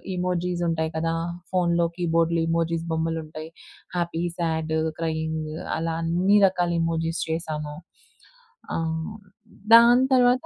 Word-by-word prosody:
Emojis 180 -1 -1
ఉంటాయి 160 -1 -1
కదా! 165 +1 0 0.4
ఫోన్‌లో, 170 -2 +2
కీబోర్డ్‌లో 165 -1 +1
ఇమోజిస్ 165 0 0
బొమ్మలుంటాయి. 160 -1 -3 0.5
హ్యాపీ, 170 -1 -1
సాడ్, 160 -2 -1 0.3
క్రయింగ్ 160 -1 -2 0.3
అలా 165 0 -2
అన్ని 180 +5 +3
రకాల 180 -2 0
ఇమోజిస్ 165 0 -1
చేశాను. 155 -2 -3 1.0
ఆహ్, 160 +4 -3 0.6
దాని 240 +2 +7
తర్వాత 250 0 +4
165 Hz, 105 wpm, -25 LUFS, 160-175 Hz, 1.0 s, దాని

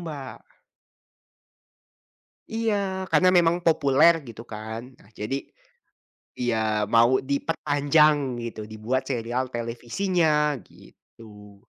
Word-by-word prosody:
Mbak. 145 -6 -8 2.1
Iya, 200 -4 -1
karena 185 - +4
memang 170 -1 +4
populer 155 0 +5 0.2
gitu 115 0 -9
kan, 110 +1 -6 0.2
nah - - -21
jadi 110 +6 -2 1.0
iya 120 -2 0 0.4
mau 120 +3 +5
diperpanjang 145 +2 +2 0.3
gitu, 115 -2 -6
dibuat 115 +5 -2
serial 120 +1 -1
televisinya, 150 +6 0
gitu. 105 -3 -17
135 Hz, 85 wpm, -25 LUFS, 115-165 Hz, 2.1 s, populer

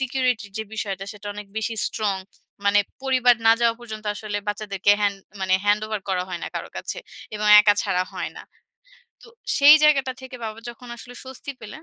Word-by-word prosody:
সিকিউরিটির 250 -5 -1
যে 220 - -3
বিষয়টা, 195 -3 -4
সেটা 210 0 -12
অনেক 210 -1 -8
বেশি 225 +1 -2 0.2
strong। 200 -3 -1 0.5
মানে 205 0 +5 0.2
পরিবার 255 -2 +4
না 225 - +9
যাওয়া 230 -1 +3
পর্যন্ত 215 -2 -8
আসলে 205 -1 -4
বাচ্চাদেরকে 205 -1 0
হ্যান্ড 200 -1 +1 0.2
মানে 185 0 +2
handover 210 +1 +1
করা 180 -1 0
হয় 175 -2 -5
না - - -3
কারো - - -4
কাছে। - - -4 0.4
এবং 210 0 -2
একা 205 -1 +4
ছাড়া 185 -2 +1
হয় - - -4
না। - - -8 0.8
তো - - -15 0.3
সেই 290 +2 +10
জায়গাটা 275 -4 +4
থেকে 260 -1 -9
বাবা 220 0 -5
যখন 240 +1 -10
আসলে 245 +1 -12
স্বস্তি 265 +2 -8
পেলেন, 225 +8 -10
215 Hz, 185 wpm, -23 LUFS, 205-250 Hz, 0.8 s, সেই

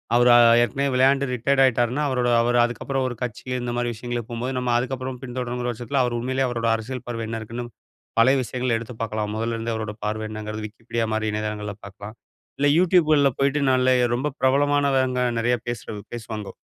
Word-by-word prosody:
அவரு 120 +1 +5
அ - - +8 0.2
ஏற்கனவே 140 +4 -1
விளையாண்டு 135 +2 +3
ரிட்டயர்ட் 135 +3 +2
ஆயிட்டாருன்னா 125 +1 +2
அவரோட 125 -2 +1
அவரு 120 +1 +2
அதுக்கப்புறம் 130 +3 -2
ஒரு 125 - -4
கட்சி 120 -4 -5 0.2
இந்த 120 0 -3
மாதிரி 120 0 0
விஷயங்களுக்கு 120 0 -5
போம்போது 125 +3 -3
நம்ம 125 -1 -1
அதுக்கப்புறம் 130 0 -3
பின்தொடரணுங்கிற 125 -1 -3
வருஷத்துல, 125 +4 -1
அவரு 120 -1 -1
உண்மையிலே 130 +2 0
அவரோட 115 -2 -2
அரசியல் 120 +3 -6
பார்வை 115 -2 -3
என்ன 115 0 -3
இருக்குன்னு 115 +3 -6 0.5
பழைய 130 +4 +6
விஷயங்கள 125 0 -1
எடுத்து 115 +2 -7
பாக்கலாம். 105 -2 -2
மொதல்ல 115 +1 -2
இருந்தே 115 +1 -3
அவரோட 110 -1 -4
பார்வ 110 +1 -2
என்னங்கிறத, 110 0 -6
Wikipedia 115 +1 -4
மாதிரி 110 0 0
இணையதளங்கள்ல 105 -1 -3
பாக்கலாம். 100 +3 -10 0.4
இல்ல 145 - +3
Youtube 180 -2 +4
கள்ல 140 -2 +4
போய்ட்டு 140 +1 +2
நல்லயே 130 -1 +3
ரொம்ப 130 +4 -1
பிரபலமானவங்க 135 -1 +2 0.2
நெறைய 120 +2 +2
பேசுறது 110 -3 -5
பேசுவாங்கோ. 110 -3 -6
120 Hz, 175 wpm, -23 LUFS, 115-130 Hz, 0.5 s, அ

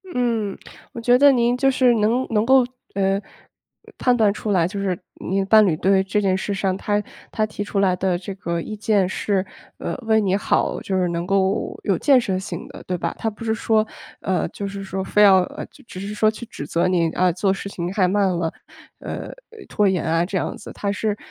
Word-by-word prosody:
嗯， 230 -5 0 0.4
我 235 - -6
觉 245 +1 +5
得 285 +1 +7
您 240 -1 +2
就 270 +1 +3
是， 255 -2 +4
能 230 +4 +1
能 215 -1 +1
够 260 0 +5 0.3
呃， 195 +1 +1 0.8
判 250 -1 +3
断 215 -4 +3
出 210 0 -3
来 175 -4 +3
就 200 +2 -5
是， 190 -3 -1 0.3
你 195 +2 +1
的 195 - 0
伴 215 +1 +6
侣 170 - +2
对 190 +2 +3
这 200 +2 0
件 190 -1 +2
事 200 +1 -3
上， 195 -1 0
他 205 +1 0 0.3
他 215 - 0
提 210 -1 -5
出 205 -1 -2
来 190 -2 +3
的 180 -1 0
这 190 +2 -7
个 170 -3 -3
意 215 - -6
见 205 -3 +1
是， 190 0 -1 0.3
呃， - - -3
为 220 -1 +3
你 195 -1 +1
好， 205 - 0
就 190 - -3
是 180 -1 +1
能 170 0 -2
够 195 0 0
有 - - +1
建 275 -3 +5
设 190 -6 -1
性 190 - -6
的， - - -11
对 180 - -1
吧？ - - -3
他 225 - 0
不 215 +1 -10
是 220 - 0
说 220 -1 +1 0.4
呃， 185 -1 0
就 200 - -5
是 195 0 -6
说 190 0 -4
非 210 +2 +3
要， 190 -3 +6 0.4
只 185 - -8
是 200 +2 -5
说 215 +1 +3
去 230 +2 -9
指 180 -10 -8
责 170 +4 +1
你， 170 -3 +2
啊， 180 +1 +2
做 190 +3 +1
事 195 - -6
情 175 -2 -4
太 190 -2 +2
慢 195 +1 +2
了， 170 -2 -1 0.5
呃， - - -6 0.4
拖 210 -2 +2
延 185 -3 +1
啊 165 +1 +1
这 190 +1 -2
样 - - -2
子， - - -10
他 200 - -3
是， 210 0 -1
200 Hz, 240 characters per minute, -22 LUFS, 185-220 Hz, 0.8 s, 得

